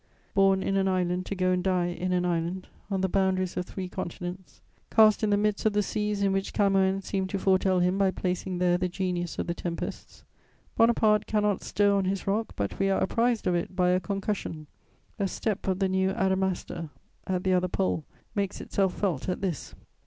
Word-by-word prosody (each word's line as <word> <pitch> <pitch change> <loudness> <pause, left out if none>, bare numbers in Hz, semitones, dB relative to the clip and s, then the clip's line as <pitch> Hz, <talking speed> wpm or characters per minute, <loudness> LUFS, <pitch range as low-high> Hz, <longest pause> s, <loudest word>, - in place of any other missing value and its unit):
Born 195 -1 +4
in 195 - 0
an 195 0 +2
island 180 -1 0
to 200 - -3
go 185 -1 +1
and 180 0 +1
die 180 -2 +1
in 180 +1 -3
an 180 0 +1
island, 175 +2 -2 0.2
on 195 -2 -1
the 190 - +2
boundaries 185 -1 +1
of 180 - -3
three 190 -2 -5
continents; 180 +1 -6 0.3
cast 215 -1 +5
in 215 - +3
the 205 - +3
midst 210 0 0
of 215 - +1
the 210 0 +2
seas 210 0 -1
in 195 -1 +2
which 195 0 -2
Camoëns 195 -1 +2
seemed 190 -1 -2
to 200 - -1
foretell 190 -1 +2
him 180 +2 +1
by 195 -1 +4
placing 185 0 -2
there 175 0 +2
the 180 0 0
genius 180 -2 -2
of - - -1
the 170 - -2
tempests, 170 -1 -6 0.5
Bonaparte 220 -2 +4
cannot 210 -2 +1
stir 205 0 +2
on 195 -1 +1
his 190 0 -2
rock 210 +3 -1
but 100 -1 -3
we 195 0 +2
are 195 - +2
apprized 230 +3 +1
of 180 - +2
it 175 +2 -2
by 180 -1 +3
a 180 0 +3
concussion; 195 -4 -3 0.5
a 200 - +1
step 205 +1 -3
of 190 -1 +1
the 195 0 +1
new 190 0 +1
Adamastor 190 -4 -1 0.4
at 185 -1 -1
the 190 - +2
other 180 0 +2
Pole 180 -3 -1 0.3
makes 200 -3 -2
itself 190 -2 0
felt 185 -6 -1
at 180 - -2
this. 180 -8 -3
190 Hz, 205 wpm, -27 LUFS, 180-200 Hz, 0.5 s, cast